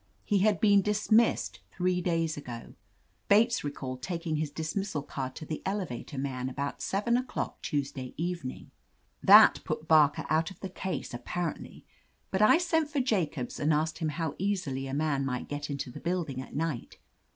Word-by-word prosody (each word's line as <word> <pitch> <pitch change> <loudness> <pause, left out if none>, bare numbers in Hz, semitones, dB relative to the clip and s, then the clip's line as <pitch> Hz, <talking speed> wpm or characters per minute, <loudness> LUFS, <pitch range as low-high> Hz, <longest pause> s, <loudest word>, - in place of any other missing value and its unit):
He 205 -2 +2
had 205 +1 +3
been 205 -2 +5
dismissed 215 +3 +2
three 180 -1 0
days 165 -2 0
ago. 120 -5 -8 0.6
Bates 225 +4 +4
recalled 130 -3 -5
tak 170 +1 -4
ing 155 -2 0
his 155 -1 -1
dismissal 160 +1 -3
card 130 -2 -5
to 155 - -7
the 155 - -4
elevator 185 - -4
man, 130 -2 -2
about 140 +2 -4
seven 210 +5 +1
o'clock 255 0 -4
Tuesday 135 -3 -3
evening. 170 -6 -4 0.5
That - - +8
put 155 - -4
Barker 150 -3 +5
out 160 +2 +2
of 190 - -13
the 190 - -4
case, 185 -6 -4
apparently, 160 +7 -4 0.5
but 190 - 0
I 215 +9 +7
sent 325 -3 +1
for 295 -2 -1
Jacobs 170 - -1
and 150 +2 +2
asked 155 +1 0
him 160 -2 0
how 160 0 -2
easily 175 -9 -1
a 135 - -5
man 145 -2 0
could 125 -2 -3
get 145 0 -4
into 140 -3 -4
the - - -8
building 170 -7 -2
at 130 - -10
night. 155 -5 -3
160 Hz, 175 wpm, -29 LUFS, 140-190 Hz, 0.6 s, That